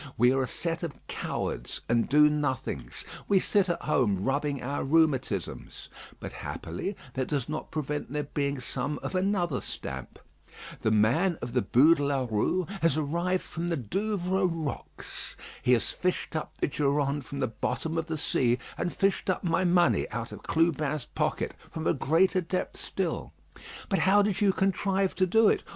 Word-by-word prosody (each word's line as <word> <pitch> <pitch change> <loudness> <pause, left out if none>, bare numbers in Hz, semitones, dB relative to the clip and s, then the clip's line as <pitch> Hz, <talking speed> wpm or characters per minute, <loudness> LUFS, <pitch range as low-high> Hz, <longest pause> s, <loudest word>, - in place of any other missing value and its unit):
We 125 +3 +5
are 135 - +2
a 130 - 0
set 165 +5 -2
of 165 -5 -4
cowards - - -3
and 115 0 +2
do 150 +2 +7
nothings; 130 - -2 0.2
we 200 - +4
sit 195 0 +2
at 170 - -1
home 110 -11 +2
rubbing 140 +1 0
our 140 +3 -2
rheumatisms; 135 - 0 0.3
but - - -6
happily 90 - -5 0.2
that 130 0 -1
does 140 -5 -1
not 155 +1 -4
prevent 150 -3 -3
there 150 0 -1
being 140 -1 -2
some 135 +3 -2
of - - -4
another 185 -6 +1
stamp. - - -6 0.6
The - - +2
man 120 - +3
of 120 - -6
the 125 - +3
Bû 150 +9 +6
de 145 - -1
la 140 -2 +1
Rue 115 - +1 0.2
has 165 -3 +3
arrived 170 +5 0
from 170 0 -4
the 170 -1 0
Douvres 190 - 0
rocks. 160 -4 -6 0.2
He 125 - +4
has 120 - +1
fished 180 -2 -2
up 155 - -4
the - - +1
Durande 140 0 0
from 140 +3 -7
the 135 - +1
bottom 155 +8 -3
of 165 0 -1
the 160 -2 -2
sea; 125 -4 +2 0.2
and 175 - 0
fished 195 0 0
up 185 - 0
my 175 +1 +2
money 175 -1 +3
out 115 0 -4
of - - -9
Clubin's 155 -4 +1
pocket, - - -1 0.2
from 160 -1 -5
a - - +3
greater 170 +7 +3
depth 180 +2 -3
still. - - -3 0.5
But 195 - +1
how 195 +4 +5
did 205 -1 0
you 200 -2 +5
contrive 195 0 +1
to 185 - +2
do 225 +4 +5
it? - - +3
150 Hz, 175 wpm, -28 LUFS, 135-180 Hz, 0.6 s, do